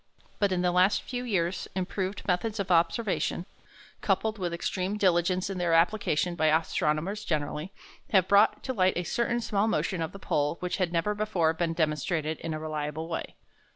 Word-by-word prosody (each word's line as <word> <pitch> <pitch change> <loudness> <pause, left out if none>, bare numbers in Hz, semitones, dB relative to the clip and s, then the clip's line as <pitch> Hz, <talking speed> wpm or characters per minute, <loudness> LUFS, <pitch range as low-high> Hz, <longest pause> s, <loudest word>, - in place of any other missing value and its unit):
But 200 -2 +2
in 180 -1 0
the 180 - +3
last 185 +3 +3
few 250 -1 -4
years 185 -6 -1
improved 190 +2 -3
methods 205 +4 0
of 195 -2 -2
observation, 175 +1 +1 0.6
coupled 220 -1 0
with 175 -2 -2
extreme 185 +3 -2
diligence 185 -1 +2
in 195 -2 -4
their 175 -2 +1
application 175 -1 +2
by 160 -2 +1
astronomers 160 +5 0
generally, 155 +1 -2 0.4
have 190 -4 +4
brought 200 +1 +4
to 260 - -2
light 185 -5 +2
a 175 - 0
certain 235 +6 0
small 210 -1 +1
motion 190 -5 0
of 160 +1 -2
the 195 - -9
pole 150 -4 0
which 180 0 -2
had 185 -3 0
never 170 +5 +1
before 200 -6 +1
been 165 0 -1
demonstrated 155 0 -1
in 165 - -4
a 155 - -3
reliable 155 0 -4
way. 165 - -5
180 Hz, 180 wpm, -28 LUFS, 165-200 Hz, 0.6 s, have